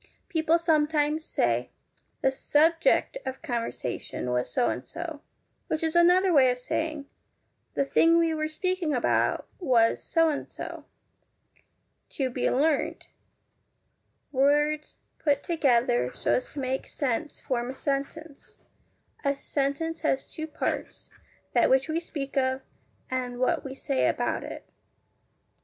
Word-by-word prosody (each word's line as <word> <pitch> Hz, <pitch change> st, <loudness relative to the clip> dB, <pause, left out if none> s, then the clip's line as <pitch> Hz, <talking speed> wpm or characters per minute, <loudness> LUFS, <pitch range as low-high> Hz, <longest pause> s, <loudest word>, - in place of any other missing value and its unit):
People 325 Hz, 0 st, +3 dB
sometimes 310 Hz, -2 st, +2 dB
say -, -, 0 dB, 0.3 s
' -, -, -42 dB
the 265 Hz, -, +4 dB
subject 325 Hz, -, +2 dB
of 260 Hz, +3 st, -6 dB
conversation 230 Hz, -, -3 dB
was 125 Hz, 0 st, -1 dB
so 240 Hz, -, +2 dB
and -, -, -2 dB
so,' 330 Hz, -3 st, -7 dB, 0.5 s
which 315 Hz, -, -2 dB
is 320 Hz, +1 st, 0 dB
another 360 Hz, +2 st, +5 dB
way 265 Hz, -4 st, +6 dB
of 250 Hz, -, 0 dB
saying 305 Hz, +3 st, -3 dB, 0.4 s
* -, -, -47 dB
the 275 Hz, -, +2 dB
thing 330 Hz, +4 st, +4 dB
we 330 Hz, -1 st, +3 dB
were 310 Hz, 0 st, -1 dB
speaking 335 Hz, -1 st, -1 dB
about 245 Hz, -, +1 dB
was 245 Hz, -9 st, +3 dB
so 330 Hz, 0 st, +2 dB
and 290 Hz, -, -3 dB
so.' -, -, -7 dB, 1.3 s
To 265 Hz, -4 st, 0 dB
be 245 Hz, -, 0 dB
learnt 290 Hz, +2 st, 0 dB, 1.2 s
Words 295 Hz, +2 st, +2 dB, 0.2 s
put 285 Hz, -2 st, +1 dB
together 240 Hz, -, +2 dB
so -, -, +1 dB
as 250 Hz, -, -1 dB
to 290 Hz, -, -5 dB
make 265 Hz, 0 st, -2 dB
sense 280 Hz, +2 st, -2 dB
form 245 Hz, -1 st, -2 dB
a 265 Hz, -, -5 dB
sentence. 280 Hz, +2 st, -4 dB, 0.7 s
A 280 Hz, -1 st, +1 dB
sentence 290 Hz, +4 st, -2 dB
has 270 Hz, -4 st, -1 dB
two 315 Hz, 0 st, -5 dB
parts: 310 Hz, -, -4 dB, 0.4 s
that -, -, +4 dB
which 265 Hz, +2 st, +3 dB
we 320 Hz, +1 st, 0 dB
speak 285 Hz, -5 st, -6 dB
of, 260 Hz, 0 st, +1 dB, 0.5 s
and 250 Hz, -1 st, -2 dB
what 255 Hz, -, +1 dB
we 270 Hz, -1 st, -7 dB
say 270 Hz, 0 st, 0 dB
about -, -, 0 dB
it. -, -, -8 dB
290 Hz, 140 wpm, -27 LUFS, 260-320 Hz, 1.3 s, way